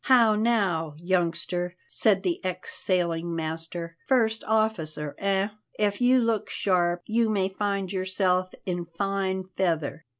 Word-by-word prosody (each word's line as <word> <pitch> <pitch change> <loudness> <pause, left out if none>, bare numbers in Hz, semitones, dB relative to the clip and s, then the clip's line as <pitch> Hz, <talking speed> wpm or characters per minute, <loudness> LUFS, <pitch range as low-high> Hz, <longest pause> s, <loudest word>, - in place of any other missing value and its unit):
"How 235 -4 +6
now, 195 -9 +1
youngster," 175 0 0
said 200 -3 +2
the 180 -1 -1
ex 185 -1 -4
sailing 170 -2 0
master, 165 +1 -5
"first 225 -4 +2
officer, 165 -10 0
eh? 195 0 +1 0.3
If 205 +1 0
you 250 +1 +5
look 230 -3 0
sharp, 175 -2 +1
you 230 0 +2
may 195 -3 +1
find 200 -1 -2
yourself 185 -1 0
in 175 -2 -3
fine 195 -1 -1
feather." 165 -5 -1
185 Hz, 130 wpm, -26 LUFS, 175-210 Hz, 0.3 s, How